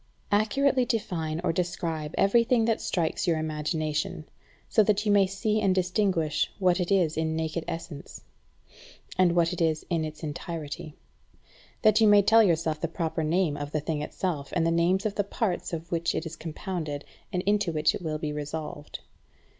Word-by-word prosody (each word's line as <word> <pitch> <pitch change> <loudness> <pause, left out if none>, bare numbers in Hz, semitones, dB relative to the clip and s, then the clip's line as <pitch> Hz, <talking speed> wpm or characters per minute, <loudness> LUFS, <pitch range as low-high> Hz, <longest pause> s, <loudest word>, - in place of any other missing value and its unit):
Accurately 255 +6 +3
define 165 -9 -2
or 170 -2 +1
describe 165 -3 -2
every 215 +4 +4
thing 235 -1 +2
that 225 -1 +1
strikes 170 +1 -1
your 165 -2 +3
imagination, 155 0 -2 0.4
so 220 - +4
that 210 0 +2
you 210 - +3
may 200 -2 +5
see 210 +3 0
and 195 -3 +2
distinguish 180 -4 +1
what 185 -2 +2
it 180 +1 -1
is 175 -5 +3
in 160 0 0
naked 160 +1 -2
essence, 165 -3 -7 0.9
and 180 -2 +3
what 170 0 +3
it 175 - -4
is 160 -2 +1
in 165 -2 +1
its 155 +1 -7
entirety; 155 0 -5 0.9
that 215 0 +5
you 220 - +6
may 205 -1 +7
tell 225 +3 +6
yourself 165 -5 +1
the 165 - 0
proper 165 -1 -2
name 160 -1 +1
of 145 0 -5
the 155 - 0
thing 150 0 -2
itself, 150 -2 -3
and 165 - +2
the 165 - +2
names 175 +4 +2
of 215 - 0
the 205 - 0
parts 205 -1 -2
of 165 0 -5
which 170 -1 0
it 160 - -2
is 165 0 -6
compounded, 160 -2 -5 0.3
and 180 0 -1
into 205 -3 +1
which 155 -1 +2
it - - -5
will 155 -3 -2
be 150 -1 -3
resolved. 150 0 -6
170 Hz, 185 wpm, -27 LUFS, 155-195 Hz, 0.9 s, may